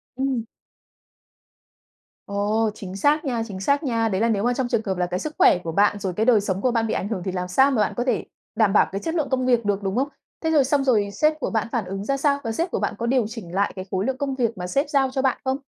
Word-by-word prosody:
Ừm. 260 Hz, -3 st, -1 dB, 1.8 s
Ồ, 210 Hz, +2 st, 0 dB
chính 195 Hz, -3 st, -8 dB
xác 295 Hz, +10 st, +2 dB
nha, 240 Hz, -4 st, -1 dB
chính 195 Hz, -3 st, -7 dB
xác 280 Hz, -, +1 dB
nha! 230 Hz, -5 st, 0 dB
Đấy 190 Hz, 0 st, -1 dB
là 230 Hz, -, +3 dB
nếu 205 Hz, -3 st, +1 dB
mà 245 Hz, +1 st, +2 dB
trong 250 Hz, 0 st, -1 dB
trường 235 Hz, -3 st, 0 dB
hợp 190 Hz, -2 st, -2 dB
là 180 Hz, -, +1 dB
cái 180 Hz, +1 st, -2 dB
sức 310 Hz, +7 st, -5 dB
khỏe -, -, +6 dB
của 165 Hz, -, -3 dB
bạn, 205 Hz, +3 st, +2 dB
rồi 190 Hz, -2 st, -3 dB
cái 215 Hz, +5 st, 0 dB
đời 230 Hz, -4 st, +5 dB
sống 190 Hz, -1 st, -2 dB
của 250 Hz, -, +2 dB
bạn 230 Hz, -1 st, 0 dB
bị -, -, -1 dB
ảnh 190 Hz, -, -2 dB
hưởng 210 Hz, -5 st, -3 dB
thì 190 Hz, -, -1 dB
làm 180 Hz, 0 st, -3 dB
sao 265 Hz, +10 st, +4 dB
mà 235 Hz, -5 st, +2 dB
bạn 210 Hz, -, 0 dB
có 240 Hz, -, +1 dB
thể 250 Hz, -3 st, 0 dB, 0.3 s
đảm 215 Hz, -3 st, +3 dB
bảo -, -, +4 dB
cái 195 Hz, +1 st, -4 dB
chất 325 Hz, 0 st, -3 dB
lượng 300 Hz, -5 st, 0 dB
công 260 Hz, -1 st, 0 dB
việc 240 Hz, -3 st, +2 dB
được, 205 Hz, 0 st, 0 dB
đúng 195 Hz, 0 st, -2 dB
không? 265 Hz, +3 st, +1 dB, 0.4 s
Thế 320 Hz, -, +1 dB
rồi 300 Hz, -3 st, +5 dB
xong 275 Hz, +1 st, +1 dB
rồi 215 Hz, -6 st, +2 dB
sếp 305 Hz, +9 st, +1 dB
của -, -, -2 dB
bạn 220 Hz, 0 st, -1 dB
phản 235 Hz, -3 st, -1 dB
ứng 195 Hz, +1 st, -5 dB
ra 275 Hz, +3 st, 0 dB
sao 280 Hz, 0 st, +2 dB
và 225 Hz, -, -2 dB
sếp 335 Hz, +10 st, -2 dB
của -, -, -1 dB
bạn -, -, -1 dB
có 235 Hz, -, -3 dB
điều 250 Hz, -1 st, +2 dB
chỉnh 215 Hz, -7 st, -9 dB
lại 200 Hz, +1 st, +1 dB
cái 185 Hz, -1 st, -6 dB
khối 190 Hz, +1 st, 0 dB
lượng 265 Hz, +1 st, -1 dB
công 280 Hz, -1 st, -2 dB
việc 235 Hz, -3 st, -1 dB
mà 180 Hz, 0 st, -4 dB
sếp 280 Hz, -, 0 dB
giao 275 Hz, -3 st, +2 dB
cho 265 Hz, 0 st, -1 dB
bạn 265 Hz, -2 st, +1 dB
không? 265 Hz, 0 st, 0 dB
230 Hz, 295 wpm, -23 LUFS, 200-265 Hz, 1.8 s, khỏe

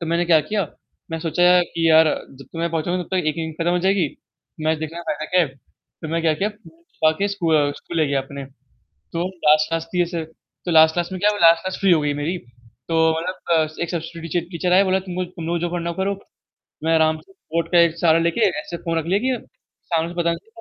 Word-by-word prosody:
तो 170 Hz, -, -4 dB
मैंने 170 Hz, +2 st, +1 dB
क्या 165 Hz, -2 st, +5 dB
किया 210 Hz, -1 st, 0 dB, 0.5 s
मैं 165 Hz, -, -3 dB
सोचा 165 Hz, +2 st, -1 dB
यार 180 Hz, 0 st, +6 dB
कि, 165 Hz, -1 st, -1 dB
यार 160 Hz, 0 st, +7 dB, 0.3 s
जब 135 Hz, 0 st, -13 dB
तक 150 Hz, -, -14 dB
मैं 170 Hz, 0 st, -1 dB
पहुँचूँगा 175 Hz, +3 st, -1 dB
तब -, -, -14 dB
तक 190 Hz, -, 0 dB
जीके 155 Hz, -, +1 dB
की 160 Hz, -, -6 dB
खत्म 165 Hz, +2 st, -1 dB
हो 180 Hz, -, +2 dB
जाएगी। 190 Hz, -3 st, +2 dB, 0.6 s
मैं 160 Hz, 0 st, +2 dB
देखना 160 Hz, +2 st, -5 dB
चाहता 155 Hz, -2 st, -3 dB
था -, -, -8 dB, 0.2 s
कि 135 Hz, -, -14 dB, 0.5 s
फिर 160 Hz, -, -6 dB
मैं 165 Hz, +1 st, 0 dB
क्या 160 Hz, -1 st, +3 dB
किया 195 Hz, +7 st, 0 dB
ब 210 Hz, -5 st, -15 dB, 0.3 s
बाकी 160 Hz, +6 st, +3 dB
स्कूल 175 Hz, -6 st, +1 dB
अ, 145 Hz, -1 st, +2 dB
स्कूल 170 Hz, -, -8 dB
ले 155 Hz, -, +3 dB
गया 140 Hz, -1 st, +1 dB
अपने। 140 Hz, +1 st, -8 dB, 0.5 s
तो 170 Hz, 0 st, -6 dB, 0.2 s
लास्ट-लास्ट 155 Hz, +2 st, +3 dB
में 180 Hz, -1 st, +3 dB
कैसे 170 Hz, -1 st, -3 dB, 0.4 s
तो 175 Hz, -, -1 dB
लास्ट-लास्ट 160 Hz, +2 st, +4 dB
में 185 Hz, -, -4 dB
क्या 210 Hz, -, +5 dB
हुआ 205 Hz, -, -4 dB
लास्ट 165 Hz, 0 st, +6 dB
क्लास 185 Hz, 0 st, -3 dB
फ्री 195 Hz, -2 st, +4 dB
हो 165 Hz, -3 st, +4 dB
गई 145 Hz, -1 st, 0 dB
मेरी। 150 Hz, +5 st, -2 dB, 0.5 s
तो 165 Hz, -1 st, +1 dB, 0.2 s
मतलब 180 Hz, +3 st, -4 dB, 0.2 s
अ, 155 Hz, -1 st, +2 dB
एक 170 Hz, -, -1 dB
संस्कृत 165 Hz, -1 st, -5 dB
के -, -, -5 dB
ची -, -, -5 dB
टीचर 180 Hz, +1 st, -1 dB
आए 190 Hz, +2 st, +6 dB
बोला 190 Hz, 0 st, +2 dB
तुम 180 Hz, -, -5 dB
लोग 185 Hz, 0 st, -1 dB
जो 175 Hz, -, -16 dB
तुम 170 Hz, -3 st, -6 dB
लोग 170 Hz, -, 0 dB
को -, -, -6 dB
जो 175 Hz, -, -1 dB
करना 170 Hz, 0 st, -2 dB
करो। 195 Hz, 0 st, -1 dB, 0.6 s
मैं 165 Hz, +1 st, +2 dB
आराम 160 Hz, 0 st, +3 dB
से -, -, -21 dB
बोर्ड 170 Hz, -, -4 dB
का 175 Hz, -, +5 dB
एक 170 Hz, -1 st, +4 dB
सहारा 165 Hz, -1 st, +4 dB
लेके 170 Hz, +6 st, 0 dB, 0.2 s
ऐसे 170 Hz, -, -7 dB
फ़ोन 165 Hz, -1 st, -3 dB
रख 160 Hz, -, -5 dB
लिया 190 Hz, +4 st, +1 dB
कि 255 Hz, -3 st, -1 dB, 0.5 s
सामने 165 Hz, +1 st, 0 dB
पता 170 Hz, -1 st, +1 dB
ना -, -, -1 dB
चले 175 Hz, -, -21 dB
170 Hz, 255 wpm, -21 LUFS, 160-180 Hz, 0.6 s, यार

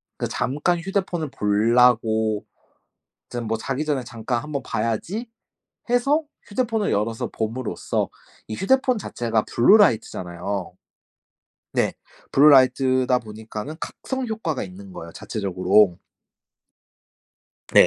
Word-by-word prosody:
그 -, -, -3 dB
잠깐 150 Hz, +6 st, 0 dB
휴대폰을 180 Hz, -3 st, -2 dB
보려고 110 Hz, 0 st, +3 dB, 0.8 s
좀 120 Hz, -1 st, -4 dB
뭐 115 Hz, +1 st, -1 dB
'자기 135 Hz, +5 st, -2 dB
전에 145 Hz, -4 st, 0 dB
잠깐 115 Hz, +1 st, -3 dB
한번 140 Hz, -1 st, -4 dB
봐야지.'해서 235 Hz, -, -2 dB, 0.2 s
휴대폰을 225 Hz, -1 st, 0 dB
열어서 110 Hz, +2 st, -1 dB
봄으로써 115 Hz, +2 st, -2 dB, 0.4 s
이 110 Hz, -, -4 dB
휴대폰 260 Hz, -, +2 dB
자체가 115 Hz, -, -1 dB
블루라이트잖아요. 100 Hz, -, +2 dB, 1.0 s
네. -, -, +1 dB, 0.4 s
블루라이트다 130 Hz, -2 st, +5 dB
보니까는 110 Hz, +5 st, -7 dB
각성 260 Hz, +5 st, -4 dB
효과가 185 Hz, -, -2 dB
있는 95 Hz, +1 st, -10 dB
거예요, 85 Hz, -2 st, -9 dB
자체적으로. 95 Hz, -2 st, +2 dB, 1.8 s
네. -, -, +8 dB
125 Hz, 260 characters per minute, -23 LUFS, 110-175 Hz, 1.8 s, 네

